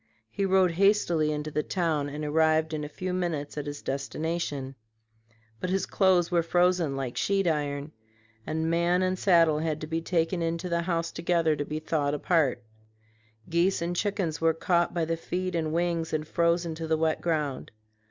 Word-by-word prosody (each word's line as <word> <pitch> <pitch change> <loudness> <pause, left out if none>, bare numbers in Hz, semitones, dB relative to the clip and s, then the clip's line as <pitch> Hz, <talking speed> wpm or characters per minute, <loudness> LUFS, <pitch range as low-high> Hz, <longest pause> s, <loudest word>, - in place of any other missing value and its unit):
He 200 - -1
rode 190 -2 +4
hastily 175 -4 +2
into 150 0 -3
the 150 - 0
town 155 -4 -1
and 150 +1 -5
arrived 160 +1 +2
in 150 -1 -2
a 150 - -5
few 185 +4 -4
minutes 165 -6 -2
at 150 -1 -4
his 145 0 -6
destination; 140 0 -3 0.9
but 185 - -3
his 190 +1 0
clothes 185 -3 +2
were 170 -1 +3
frozen 175 -3 +2
like 130 -3 -4
sheet 195 -1 +1
iron, 145 -2 -1 0.5
and 160 +4 -2
man 170 +2 +2
and 185 0 0
saddle 165 -5 +4
had 155 -1 -1
to - - -3
be 165 +1 -2
taken 170 +1 0
into 165 +2 -2
the 170 0 +1
house 170 -1 -1
together 165 -2 +1
to 145 0 -3
be 150 - -4
thawed 150 -2 -1
apart. 145 -6 +1 0.8
Geese 170 +3 +2
and 170 +1 -2
chickens 190 -5 -1
were 165 -1 +3
caught 170 0 +1
by 170 -2 -1
the 165 +1 -1
feet 185 +2 -3
and 160 -2 -1
wings 170 -1 -1
and 155 0 -1
frozen 170 0 +1
to 160 0 -5
the 160 0 +2
wet 160 0 0
ground. 150 -5 -2
165 Hz, 180 wpm, -27 LUFS, 155-175 Hz, 0.9 s, rode